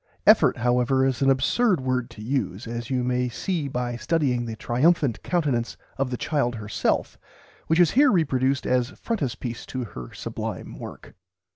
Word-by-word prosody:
"Effort," - - +6
however, 125 +3 +2
is 135 -1 0
an 135 - +4
absurd 180 - +3
word 130 -1 -1
to 110 -3 -11
use, 120 -4 -2
as 115 0 -5
you 130 -2 0
may 125 0 0
see 160 +4 -2
by 125 -2 -2
studying 125 -3 0
the 115 -1 -5
triumphant 135 +2 +1
countenance 140 -9 -1 0.2
of 135 -1 -1
the 125 - -3
child 130 -5 0
herself, 105 -2 -1 0.5
which 160 +2 +2
is 175 -3 +5
here 280 +1 +5
reproduced 135 -6 +1
as 125 -1 +1
frontispiece 130 - -3
to 130 -1 -4
her 65 - -8
sublime - - -6
work. - - -10
130 Hz, 160 wpm, -25 LUFS, 120-145 Hz, 0.5 s, Effort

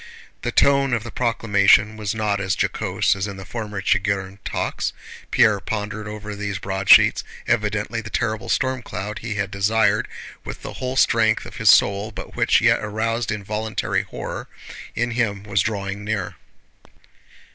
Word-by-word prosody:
The - - -2
tone 140 -2 +3
of 110 - -3
the 120 - -8
proclamation 105 -3 +3
was 110 +1 -3
not 105 -2 0
as 95 -1 -1
jocose - - +1
as 100 +1 -2
in 100 -1 -7
the 95 - -9
former 105 -2 -5
Chigírin 95 +1 0
talks. - - -2 0.4
Pierre 105 -2 +4
pondered 105 +1 -4
over 105 0 -6
these 100 -1 -3
broadsheets. 95 0 +5 0.2
Evidently 110 0 0
the 110 - -9
terrible 110 -1 -2
stormcloud 110 -5 -2
he 105 0 -4
had 100 -1 -2
desired 105 +3 +2 0.4
with - - -8
the - - -6
whole 130 0 -4
strength - - +3
of - - -10
his - - +3
soul 100 +2 +5
but 105 - -9
which - - +3
yet - - +4
aroused 110 +2 -1
involuntary 105 +1 -2
horror - - -6 0.5
in 120 +2 0
him 110 -4 -1
was 100 -2 +1
drawing 100 -1 -3
near. 105 -4 -2
105 Hz, 155 wpm, -22 LUFS, 100-110 Hz, 0.5 s, broadsheets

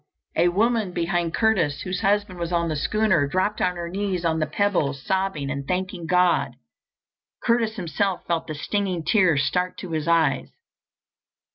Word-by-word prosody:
A 170 +2 +4
woman 215 0 +1
behind 170 -1 -1
Curtis, 185 -11 +1
whose 185 0 -3
husband 200 -2 +1
was 170 0 -3
on 170 -1 +1
the 155 - -1
schooner, 185 -2 +2
dropped 185 +7 0
on 180 - +1
her 170 -1 -4
knees 185 -1 -2
on 160 -1 +1
the 155 - 0
pebbles, 150 -5 0
sobbing 190 -8 -1
and 140 -1 -5
thanking 185 -2 -3
God. 180 0 +2 0.9
Curtis 230 -2 +1
himself 190 0 -2
felt 165 -1 -1
the 155 - -5
stinging 185 +2 -2
tears 175 -7 +3
start 180 +5 -1
to 180 - -7
his 155 -1 -2
eyes. 160 -6 +2
180 Hz, 160 wpm, -24 LUFS, 160-195 Hz, 0.9 s, A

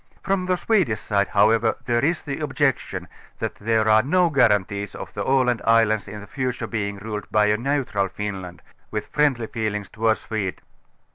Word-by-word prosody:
From 190 -2 0
the 185 -1 +2
Swedish 175 - +1
side 100 -2 0
however 110 +2 +3
there 120 -1 +1
is 165 +3 +1
the 140 -1 -4
objection, 135 - -1 0.3
that - - -3
there 110 +1 +1
are 110 0 +6
no 170 +7 +2
guarantees 105 -6 +2
of - - -8
the - - -3
Aland 130 -3 +2
islands 115 -2 +3
in 105 +1 -8
future 130 +1 -3
being 100 -3 -3
ruled 105 0 -6
by 105 -1 +3
a 105 0 +3
neutral 125 -6 0
Finland, 95 -4 -6 0.3
with 105 -1 -5
friendlj^ 135 -6 +1
feelings 105 -3 -2
towards 110 0 0
Sweden. 100 -5 -3
110 Hz, 165 wpm, -23 LUFS, 105-135 Hz, 0.3 s, are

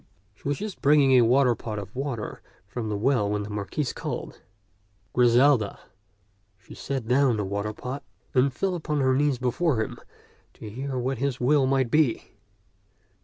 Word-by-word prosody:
She 105 - -10
was 145 -1 0
just 210 -2 -6
bringing 140 -1 +5
a 130 -1 +7
waterpot 120 -3 +2
of 100 +1 -7
water 130 -5 -4 0.2
from 110 +2 -5
the 105 - -1
well 105 -2 +1
when 105 0 -1
the 105 - -7
Marquis 105 +8 -3
called, - - -6 0.7
"Griselda." 125 -2 +4 0.8
She 100 - -15
set 135 -5 -4
down 125 -1 +3
the 105 - -1
waterpot 105 +7 -4 0.3
and 130 +1 +3
fell 190 +7 -1
upon 155 -4 -2
her 130 -1 +3
knees 145 -1 +2
before 130 +2 0
him 110 - -3 0.6
to - - -10
hear 130 +5 -4
what 130 0 -2
his 135 -1 -1
will 135 +2 +3
might 130 -3 +1
be. 150 -6 +1
125 Hz, 160 wpm, -26 LUFS, 110-140 Hz, 0.8 s, a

